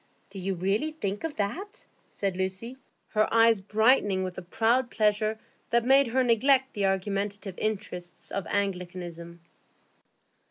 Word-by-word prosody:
"Do 195 - -7
you 190 +1 -2
really 200 - 0
think 205 -9 -4
of 325 -2 -3
that?" 360 - -4 0.3
said 195 -2 -2
Lucy, 190 +6 -3 0.3
her 215 -1 +1
eyes 230 -2 +5
brightening 210 -2 +3
with 185 -1 -4
a - - -6
proud 230 +7 +1
pleasure 215 0 +1 0.3
that 235 0 +2
made 270 +1 +5
her 255 +3 +2
neglect 260 +3 +3
the 200 -3 +1
argumentative 195 +1 -2
interests 190 -5 -4
of 195 -4 -3
Anglicanism. 175 -3 -3
205 Hz, 135 wpm, -27 LUFS, 190-230 Hz, 0.3 s, eyes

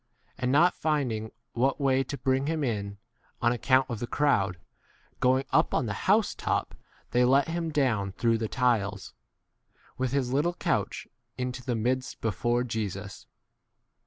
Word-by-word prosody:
And 125 0 -1
not 170 +6 +5
finding 125 -9 -1 0.2
what 130 +3 +1
u 140 - -1
way 135 0 +3
to 140 - -5
bring 135 +1 0
him 160 -1 -1
in, 100 -5 -2 0.4
on 120 - +3
account 130 +2 +3
of 120 -5 -4
the 120 - -3
crowd, 100 -12 +1 0.6
go 130 0 +4
ing 135 - -3
up - - +3
on - - +1
the - - -2 0.2
house - - +4
[top] - - -2 0.4
they 125 +1 +3
let 135 +4 +4
him 165 0 -2
down 115 -10 0
through 115 +2 +1
the 110 - -1
tiles, 110 -6 0 0.9
with 130 -1 0
his 130 -2 0
little 165 +6 +1
couch, 165 -6 -1 0.3
into 125 0 -4
the 125 -2 -1
midst 125 +4 -1
before 120 +2 0
Jesus. 105 -4 -5
125 Hz, 160 wpm, -28 LUFS, 115-135 Hz, 0.9 s, not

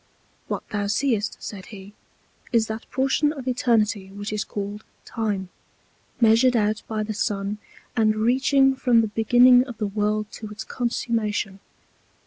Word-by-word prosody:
What - - -4
thou 205 -1 -2
seest, 215 -1 0
said 195 -3 -8
he, 200 -1 -11 0.6
is 230 -2 +3
that 220 0 -7
Portion 270 +3 +1
of 270 -4 -8
Eternity 225 -5 +1
which 205 +1 -6
is 210 - -1
called 205 +1 -6 0.2
Time, 205 -5 -3 0.7
measured 235 +2 +5
out 215 -1 +1
by 215 -1 -2
the 215 +1 -4
Sun, 205 -1 -2 0.4
and 215 -2 +3
reaching 265 +4 +3
from 245 -3 +3
the 220 - -1
Beginning 245 +3 +5
of 240 -4 -8
the 215 - -1
World 210 +1 -1
to 215 - -8
its 210 +1 -7
Consummation. 220 -5 -2
220 Hz, 145 wpm, -24 LUFS, 210-245 Hz, 0.7 s, measured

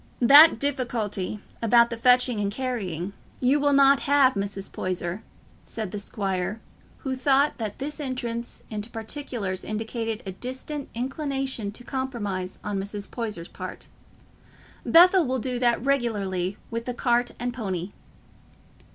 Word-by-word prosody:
"That 285 +4 +9
difficulty—about 235 -3 0
the - - -1
fetching 250 -1 +4
and 200 -1 0
carrying—you 225 - -2
will 290 0 +3
not 275 0 +6
have, 280 -2 +4
Mrs. 200 -1 -4
Poyser," 180 +1 -3 0.4
said 215 -5 -5
the 210 - -4
squire, 195 0 -2 0.4
who 265 -2 -1
thought 275 +2 +2
that 215 -3 -4
this 295 +3 -4
entrance 240 -4 -4
into 210 +1 -4
particulars 225 -5 -4
indicated 225 +1 -3
a 190 - -4
distant 260 +7 -6
inclination 270 -3 -2
to 245 - -8
compromise 210 -9 -3
on 205 -1 -2
Mrs. 200 +1 -6
Poyser's 215 -8 -4
part. - - -8 0.9
"Bethell 355 -1 +6
will 260 +1 0
do 250 0 -2
that 240 0 +2
regularly 205 -8 0
with 230 0 -3
the 250 - -3
cart 240 0 +1
and 245 0 -2
pony." 190 -6 -4
235 Hz, 130 wpm, -26 LUFS, 205-265 Hz, 0.9 s, That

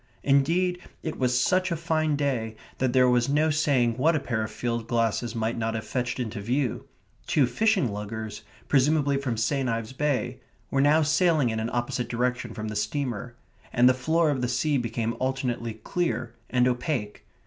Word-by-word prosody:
Indeed, 170 +6 +2 0.2
it 160 - -4
was 125 -1 +2
such 185 +7 +2
a - - +1
fine 155 -2 0
day 125 -6 -1 0.2
that 130 -1 +1
there 130 0 +5
was 125 0 +3
no 155 +2 +3
saying 130 -6 +2
what 160 +5 +4
a - - +2
pair 115 -5 -2
of 110 - -3
field 115 -2 -3
glasses 115 0 0
might 115 +1 -1
not 115 0 -1
have 110 -1 -4
fetched 125 +1 -2
into 110 -4 -3
view. 125 +3 -1 0.4
Two 145 - +3
fishing 195 - +1
luggers, 105 +1 -5 0.3
presumably 145 0 +3
from 130 -4 -2
St. 130 +3 0
Ives 115 +1 -3
Bay, 130 -3 -1 0.3
were 135 - +2
now 150 +3 +5
sailing 155 -4 +3
in 110 - -2
an 110 +1 -2
opposite 120 0 -2
direction 125 -1 -1
from 110 0 -4
the 105 - -5
steamer, 120 +1 -3 0.4
and 120 +1 +5
the 130 - +6
floor 160 +5 +2
of 135 -3 -1
the 125 - 0
sea 150 +4 +1
became 115 -1 -2
alternately 125 -3 -2
clear 120 0 -2 0.2
and 125 0 +3
opaque. 125 -4 -2
125 Hz, 180 wpm, -26 LUFS, 115-145 Hz, 0.4 s, the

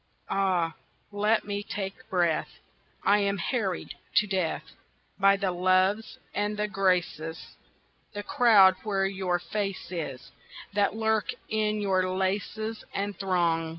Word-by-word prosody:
Ah, 180 -4 +1 0.4
let 210 +2 +2
me 205 0 -2
take 205 +4 -6
breath! 175 -5 +1 0.6
I 205 +1 +5
am 200 0 +1
harried 195 -1 -2 0.2
to 210 - +5
death 190 -5 -1 0.6
By 195 0 +5
the 195 -2 0
loves 185 +4 +2 0.2
and 205 +1 -1
the 210 0 0
graces 180 -5 -1 0.6
That 205 0 -5
crowd 200 -6 +6
where 195 -3 0
your 190 -2 0
face 195 +1 -4
is 160 -7 -5 0.4
That 205 +1 +2
lurk 220 -1 +1 0.2
in 215 -1 0
your 185 -2 +1
laces 200 +4 -2
and 200 0 -2
throng. 170 -4 +1
195 Hz, 125 wpm, -28 LUFS, 185-210 Hz, 0.6 s, crowd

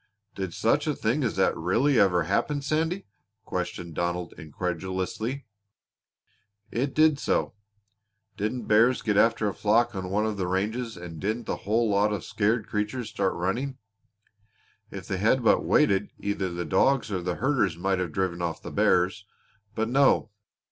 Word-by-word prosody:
"Did 95 -2 -4
such - - +1
a - - 0
thing - - 0
as - - -1
that - - +2
really 115 - +2
ever 90 -4 +4
happen, 140 - 0
Sandy?" 160 +6 -1 0.4
questioned 90 -2 -4
Donald 85 +1 -2
incredulously. 95 - -4 1.3
"It 135 +3 -2
did 155 -2 +4
so. - - 0 0.8
Didn't 110 +3 -3
bears 115 +4 +4
get 105 -2 +1
after 115 0 +3
a 100 - -1
flock 115 +3 +2
on 95 -2 -4
one 105 +3 +1
of 110 -2 -2
the 95 -2 -1
ranges 110 +6 -2
and 85 -2 -8
didn't 110 +5 -2
the - - -2
whole 115 +2 +3
lot 105 0 +2
of 105 -4 -3
scared 110 +2 0
creatures 105 +2 -3
start 100 -3 0
running? 120 +10 -2 1.1
If - - -8
they 95 - -2
had 115 +6 +2
but - - +4
waited 105 -9 +3
either 100 -2 -2
the 85 0 -4
dogs 130 - +2
or 95 -2 -1
the 90 0 -2
herders 120 - +1
might 95 +1 0
have 90 -3 -2
driven 95 -2 -2
off 85 -2 -2
the - - -7
bears. 90 +3 +2 0.5
But 110 0 0
no! 135 -3 +3
105 Hz, 160 wpm, -26 LUFS, 90-120 Hz, 1.3 s, ever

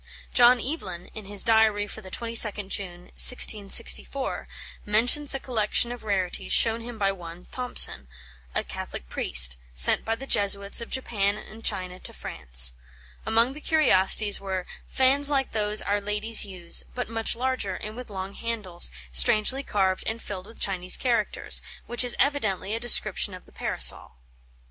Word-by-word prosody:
John 245 0 +5
Evelyn, 235 - -6
in 215 -2 -9
his 200 0 -2
Diary 220 -2 +3
for 220 - -8
the 190 - -11
22nd 215 -2 0
June, 175 -3 -5
1664, 250 +3 +3 0.4
mentions 245 +7 +1
a - - -3
collection 235 -1 +1
of 245 - -8
rarities 190 -4 -2
shown 225 0 +2
him 235 0 -9
by 195 -2 0
one 175 -2 -11
Thompson, 245 - -1 0.5
a - - 0
Catholic - - -8
priest, - - +3 0.2
sent 60 - +7
by 225 - -2
the 265 +4 -10
Jesuits 200 -2 +2
of 235 - -8
Japan 205 -6 -1
and 220 +1 -11
China 185 0 -2
to - - -4
France. 60 0 0 0.5
Among 230 +4 +2
the 300 - -11
curiosities 210 -10 +3
were 190 -2 -4 0.2
"fans 275 +2 +3
like 275 -2 0
those 210 -1 -1
our 205 0 -1
ladies 210 +1 +1
use, 180 -3 -1
but 250 - -4
much 225 0 -2
larger, 245 -6 -3
and 215 +1 -8
with 250 -1 -9
long 195 -1 -7
handles, 210 -7 -3 0.2
strangely 215 - +2
carved 190 -7 -1
and 220 +1 -3
filled 195 -3 -8
with 225 - -15
Chinese 185 -2 0
characters," 235 -4 0 0.2
which 240 +1 0
is 245 - 0
evidently 215 -9 -1
a 225 - -2
description 210 -4 +3
of 180 - -14
the - - -21
Parasol. - - +2
210 Hz, 160 wpm, -25 LUFS, 190-240 Hz, 0.5 s, sent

